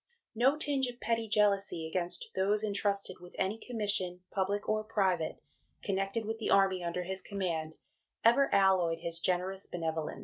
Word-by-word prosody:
No 255 +6 +3
tinge 285 -4 +1
of 245 0 -7
petty 230 0 0
jealousy 200 -5 +2
against 175 +1 -3
those 205 +3 +2
entrusted 200 -2 0
with 180 0 -13
any 205 +4 0
commission, 205 -7 -2
public 200 +1 -1
or 215 0 +1
private, 190 -7 0 0.5
connected 195 +3 -1
with 225 +1 -3
the 225 - -2
Army 190 -2 +4
under 175 +1 -2
his 190 +1 -4
command, 165 -6 -3 0.5
ever 265 +4 +5
alloyed 185 -4 +3
his 170 0 -4
generous 185 +2 -1
benevolence." 160 -2 -3
195 Hz, 150 wpm, -32 LUFS, 180-215 Hz, 0.5 s, ever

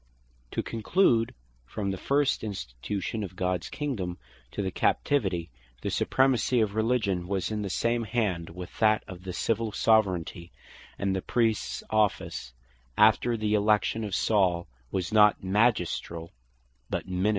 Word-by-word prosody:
To - - -1
conclude; 115 - +2 0.3
from 100 - -3
the 95 - -3
first 140 -3 +1
institution 100 - -4
of 95 -2 -7
Gods 90 -2 -1
Kingdome, 105 -13 -3 0.3
to 100 - -4
the 95 - -2
Captivity, 95 - 0 0.3
the - - -1
Supremacy 130 -1 +2
of 105 -2 0
Religion, 110 -5 0
was 95 0 -1
in 105 -1 -2
the 100 - -3
same 115 +3 0
hand 100 -7 -1
with 90 +1 -9
that 110 -2 +4
of 90 -1 -9
the 95 - -4
Civill 115 +4 -1
Soveraignty; 95 -6 +1 0.5
and 100 -1 0
the 95 - -1
Priests 110 - 0
office 105 - 0 0.5
after 110 +2 +4
the 110 -1 0
election 105 +1 +2
of 100 -3 -2
Saul, 90 -5 +2 0.2
was 95 - -3
not 105 -2 +5
Magisteriall, 95 -5 0 0.6
but - - -2
Ministeriall. 95 +2 0
105 Hz, 140 wpm, -28 LUFS, 90-110 Hz, 0.6 s, not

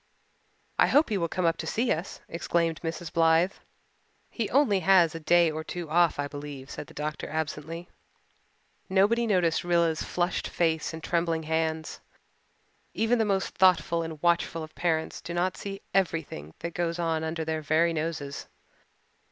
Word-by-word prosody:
"I - - +6
hope 295 0 +4
he 210 - 0
will 170 - 0
come 180 +1 -1
up 165 0 +2
to - - -5
see 235 +2 0
us," 165 +4 -3
exclaimed 170 -1 -1
Mrs. 165 0 -5
Blythe. 165 +2 +4 0.8
"He 225 -4 -2
only 250 -7 +3
has 180 -2 +5
a 165 - -5
day 170 +1 +4
or 155 +1 -4
two 170 -1 -6
off, 170 0 +4
I 145 0 -1
believe," 145 -1 -8
said 150 - -7
the - - -16
doctor 150 +1 -4
absently. 160 +2 -4 1.0
Nobody 210 +5 +3
noticed 180 -6 +2
Rilla's 170 -2 +2
flushed 175 +1 -1
face 160 -2 0
and 160 0 -8
trembling 165 -1 0
hands. 160 0 -2 1.0
Even 230 +2 +2
the 220 - +3
most 195 -2 0
thoughtful 180 -2 +3
and 160 -2 -6
watchful 170 -1 +1
of 155 - -10
parents 160 -2 -1
do 170 - -6
not 180 +1 0
see 195 0 -7
everything 160 - -1
that 170 0 -4
goes 170 0 -1
on 165 -2 0
under 160 0 -3
their 160 0 -2
very 160 +3 +2
noses. 155 -3 -4
165 Hz, 165 wpm, -28 LUFS, 160-180 Hz, 1.0 s, I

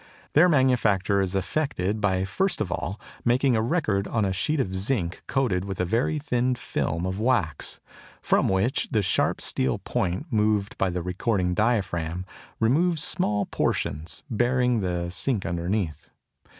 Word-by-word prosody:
Their 170 +5 +6
manufacture 110 - +3
is 95 0 -1
effected 105 -3 -1
by 95 -2 +1
first 190 - 0
of 90 - -2
all 95 +3 -3 0.2
making 125 +1 +3
a 110 - +2
record 110 - 0
on 110 -3 0
a 95 - 0
sheet 150 +10 0
of 95 -7 -1
zinc 95 -3 -1
coated 115 -10 +1
with 95 -2 -5
a 90 - +1
very 115 - +1
thin 125 -4 0
film 85 -6 -2
of 95 +2 -3
wax, 110 - 0 0.4
from - - +2
which 95 +7 +1
the 105 -2 +1
sharp 90 - +1
steel 65 0 0
point 95 - -2
moved 105 -1 +1
by 95 - +2
the 90 -1 -3
recording 90 0 0
diaphragm 90 -5 0 0.3
removes 155 +7 +2
small 105 - 0
portions, 75 +4 -2
baring 125 0 +2
the 90 -2 -2
zinc 110 +2 -1
underneath. 85 -1 -2
100 Hz, 150 wpm, -26 LUFS, 90-125 Hz, 0.4 s, Their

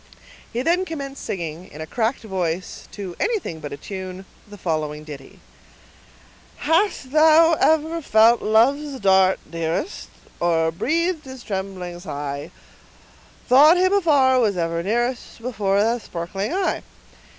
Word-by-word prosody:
He 240 +2 -2
then 345 +5 +2
commenced 280 -6 -6
singing, 170 -1 -5
in 150 - -11
a 155 - -4
cracked 225 - -2
voice, 185 -4 -3
and - - -23
to 190 -4 -7
anything 410 - -2
but 145 -2 -7
a 140 - -6
tune, 190 +3 -7 0.2
the 205 0 -12
following 155 -4 -3
ditty:— 145 -3 -11 1.2
Hast 320 -4 0
thou 320 +2 +6
ever 320 +1 +2
felt 230 -3 +4
love's 270 +6 +2
dart, 190 -2 +4
dearest, 165 - -3 0.3
Or 165 -1 +2
breathed 325 - -1
his 260 -2 -10
trembling 190 -3 -5
sigh— 145 -4 -5 1.0
Thought 295 +7 +7
him, 370 +2 +3
afar, 285 -9 +4
was 210 -6 +1
ever 170 0 -1
nearest, 240 +8 -2
Before 210 -5 0
that 230 +2 0
sparkling 180 - -4
eye? 375 +1 -1
215 Hz, 135 wpm, -22 LUFS, 175-285 Hz, 1.2 s, Thought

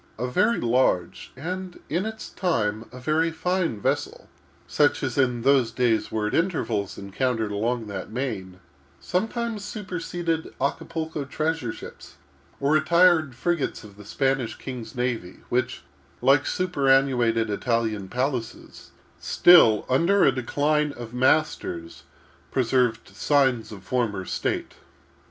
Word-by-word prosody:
A 120 - -2
very 180 - +2
large, 120 -7 0
and, 180 +5 -5
in 175 +8 -1
its 220 0 -7
time, 110 - -1
a 125 - -10
very 155 +5 +1
fine 165 - -1
vessel, - - -2 0.4
such 145 -1 +2
as 130 -3 -2
in 125 -4 +1
those 135 -3 +4
days 115 -2 +1
were 110 -1 -1
at 105 - -2
intervals 125 - -1
encountered 110 +2 -2
along 115 +3 -1
that 100 -2 -6
main; 105 -7 -4 0.4
sometimes 225 +2 -2
superseded 175 -5 -4
Acapulco 160 +2 -2
treasure 155 -2 -2
ships, - - -11 0.4
or 140 +1 +1
retired 165 -3 +4
frigates 170 -5 -1
of 105 -2 -13
the 105 - -12
Spanish 135 0 -1
king's 120 -4 -8
navy, 120 -7 -3
which, 125 +1 -1 0.4
like 135 +1 +4
superannuated 135 -9 +2
Italian 110 -2 -1
palaces, 125 -1 -4 0.3
still, 140 -12 +6
under 170 +10 +3
a 135 - +6
decline 145 +4 0
of 120 -2 -9
masters, 125 - 0 0.4
preserved 125 -2 +1
signs 130 -6 +1
of 100 -3 -10
former 105 -4 -1
state. - - -2
130 Hz, 125 wpm, -25 LUFS, 115-160 Hz, 0.4 s, still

